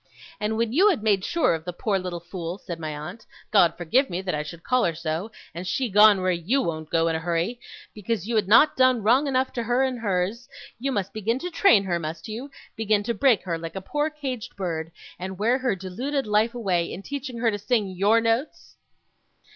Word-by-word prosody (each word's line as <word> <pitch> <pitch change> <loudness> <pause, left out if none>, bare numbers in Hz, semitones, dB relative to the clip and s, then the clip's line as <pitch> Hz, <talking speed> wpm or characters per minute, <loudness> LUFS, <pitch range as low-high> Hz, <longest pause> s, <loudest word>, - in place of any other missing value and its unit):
'And 215 +1 -1
when 230 0 0
you 380 +9 +5
had 300 - 0
made 200 -4 +2
sure 335 - +2
of 160 -1 -4
the 180 - -4
poor 195 +2 -1
little 180 -2 -5
fool,' 175 0 -6
said 170 -5 -7
my 155 -2 -4
aunt 175 +10 -8 0.3
'God 195 -5 +4
forgive 240 - +2
me 175 - -3
that 185 - -2
I 150 - -1
should 165 +2 -9
call 255 -1 +2
her 165 - 0
so, 165 +6 -3 0.2
and 175 +2 -6
she 255 +5 -1
gone 210 -1 +6
where 185 0 +2
YOU 180 +10 0
won't 160 -8 -3
go 165 0 +2
in 165 - 0
a - - -1
hurry 175 +8 -1 0.3
because 210 -2 -3
you 235 - -1
had 210 -3 +2
not 235 +9 +6
done 255 -3 +3
wrong 255 +7 +4
enough 260 -1 0
to 240 - -2
her 245 +3 +1
and 260 -2 -1
hers, 205 +3 -2 0.3
you 270 +3 -1
must 200 -6 -2
begin 220 +3 -1
to 355 +6 -5
train 330 - +5
her, 175 -3 -1
must 160 0 -6
you? 230 +6 -6 0.3
begin 215 -2 +1
to 235 - -1
break 245 -1 +3
her, 170 -3 -3
like 165 +2 -7
a - - -2
poor 295 +10 -1
caged 270 -7 -6
bird, 165 -4 -4 0.3
and 185 +1 -5
wear 235 +6 +2
her 255 -6 0
deluded 245 +10 -3
life 215 +3 +1
away, 185 -7 0
in 195 - -7
teaching 270 -2 -5
her 230 -1 +2
to 205 - -4
sing 220 +1 +1
YOUR 200 +5 +3
notes? 230 +5 -2
210 Hz, 225 wpm, -25 LUFS, 175-245 Hz, 0.3 s, gone